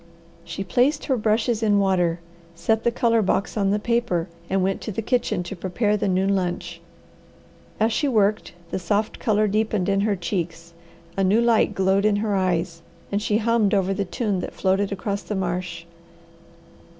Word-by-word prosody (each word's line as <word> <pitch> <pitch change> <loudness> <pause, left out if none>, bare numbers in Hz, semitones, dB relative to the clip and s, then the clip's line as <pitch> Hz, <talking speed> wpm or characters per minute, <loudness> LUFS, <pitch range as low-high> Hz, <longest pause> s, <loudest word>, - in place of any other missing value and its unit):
She 170 +3 -5
placed 260 +9 +1
her 265 - +1
brushes 220 0 +1
in 210 -2 +3
water, 180 -4 +1 0.3
set 220 +6 0
the - - +3
colour 230 -1 +2
box 195 0 0
on 200 -2 +1
the 205 - +2
paper, 225 -6 0 0.2
and 190 -1 +1
went 195 +1 -1
to 220 - -4
the 220 +3 -3
kitchen 215 -6 0
to 175 - -6
prepare 200 +4 0
the 205 - -1
noon 190 +1 +2
lunch. 180 -2 -3 1.0
As 220 +1 +2
she 290 - +1
worked 215 -4 +1 0.2
the - - -1
soft 205 +4 -1
colour 215 -1 +2
deepened 210 -2 0
in 195 0 +2
her 205 0 +1
cheeks, 170 -2 -4 0.4
a 195 - +1
new 195 +4 +4
light 230 -3 +3
glowed 190 +1 +2
in 215 -1 +3
her 210 0 -1
eyes, 175 -2 -1 0.3
and 200 +1 0
she 210 0 +1
hummed 225 -2 +2
over 195 0 +1
the 200 - -1
tune 195 +1 -2
that - - -6
floated 195 +1 +1
across 200 +1 -3
the 185 +4 -5
marsh. 175 -2 -3
200 Hz, 180 wpm, -23 LUFS, 185-220 Hz, 1.0 s, new